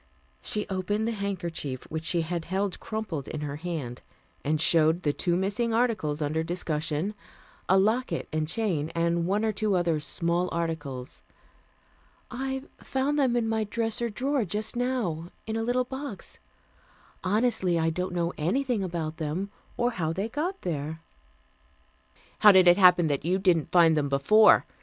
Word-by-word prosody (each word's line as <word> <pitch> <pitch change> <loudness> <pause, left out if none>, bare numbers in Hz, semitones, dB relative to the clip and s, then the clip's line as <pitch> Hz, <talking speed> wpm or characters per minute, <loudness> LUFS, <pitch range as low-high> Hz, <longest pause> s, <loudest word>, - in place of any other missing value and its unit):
She 210 - +1
opened 205 +3 -1
the - - 0
handkerchief 175 - -4
which 160 0 -4
she 170 0 +1
had 165 0 -3
held 190 +1 -2
crumpled 210 - -4
in 155 - -5
her 145 -1 -4
hand, 150 -7 -5 0.4
and 155 +1 0
showed 165 +2 +3
the 145 - +1
two 175 +2 0
missing 220 +5 0
articles 185 -11 0
under 155 +2 0
discussion, 160 +1 -2 0.6
a 190 - +6
locket 220 +6 +1
and 155 0 0
chain 170 -5 -1
and 170 0 +1
one 205 +3 +1
or 220 - +2
two 210 -1 0
other 170 -3 +1
small 170 +4 -1
articles. 145 - -4 1.1
"I 265 +2 -3 0.2
found 275 +3 -1
them 255 -4 +2
in 235 -2 +1
my 220 0 0
dresser 230 +2 -1
drawer 265 +4 0
just 210 +5 -2
now, 230 -10 -1 0.2
in 220 - -3
a 225 - -1
little 245 +2 +1
box. 265 -7 -7 0.8
Honestly, 190 -3 +2
I 165 0 +1
don't 180 +2 -3
know 170 0 0
anything 230 - 0
about 165 -3 -3
them, 165 +6 -3 0.3
or 240 +1 +1
how 165 -7 -2
they 195 +5 -2
got 340 - -3
there." 160 -1 -3 1.4
"How 210 - +9
did 185 -2 +6
it 175 +1 +7
happen 180 -3 +6
that 145 -3 -1
you 180 +4 +1
didn't 180 -5 +2
find 165 -3 +6
them 145 -2 0
before?" 175 +11 +5
180 Hz, 160 wpm, -27 LUFS, 160-220 Hz, 1.4 s, How